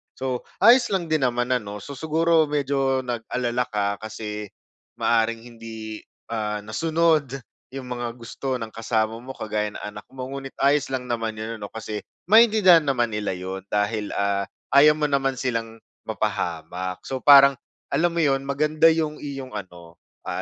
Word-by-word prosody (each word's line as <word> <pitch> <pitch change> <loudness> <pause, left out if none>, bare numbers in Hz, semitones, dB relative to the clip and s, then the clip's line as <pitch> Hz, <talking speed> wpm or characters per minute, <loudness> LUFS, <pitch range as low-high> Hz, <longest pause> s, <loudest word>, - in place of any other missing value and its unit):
So, 130 -1 -3 0.2
ayos 240 +4 +7
lang 175 -4 -1
din 155 -3 +2
naman 120 0 0
ano 105 -5 -2
so, 140 - -8
siguro 160 +2 +2
medyo 135 -2 0
nag-alala 120 0 -2
ka 100 -3 -1
kasi 105 -1 -6 0.5
maaaring 115 0 +1
hindi, 110 -2 -8 0.3
ah, 105 -2 -2
nasunod 155 +3 +1 0.3
yung 135 0 -7
mga 120 -1 -4
gusto 125 +3 -4
ng 115 -3 -5
kasama 110 0 -1
mo 130 +2 -9
kagaya 105 -1 -3
ng - - -8
anak 105 0 -8
mo 130 -1 -7
ngunit 135 -1 -7
ayos 145 +1 +3
lang 130 -1 -3
naman 115 -3 -3
yun 110 +1 -5
ano 100 - -6
kasi 110 0 -6 0.3
maintindihan 215 -6 +7
naman 120 -4 +1
nila 105 -3 -2
'yon 95 +1 -5
dahil, 105 +1 -1
ah, 100 -1 0 0.2
ayaw 145 +3 +7
mo 155 - -3
naman 135 -1 +1
silang 115 -3 -3 0.3
mapahamak. 90 +2 -3
So 130 - -4
parang 140 -1 +7 0.3
alam 165 +5 +2
mo 170 - +2
'yon, 135 -2 +1
maganda 150 +3 +3
yung 160 -2 +1
iyong 135 -3 -6
ano, 90 -5 -9 0.2
ah, - - -3
125 Hz, 160 wpm, -24 LUFS, 110-140 Hz, 0.5 s, ayos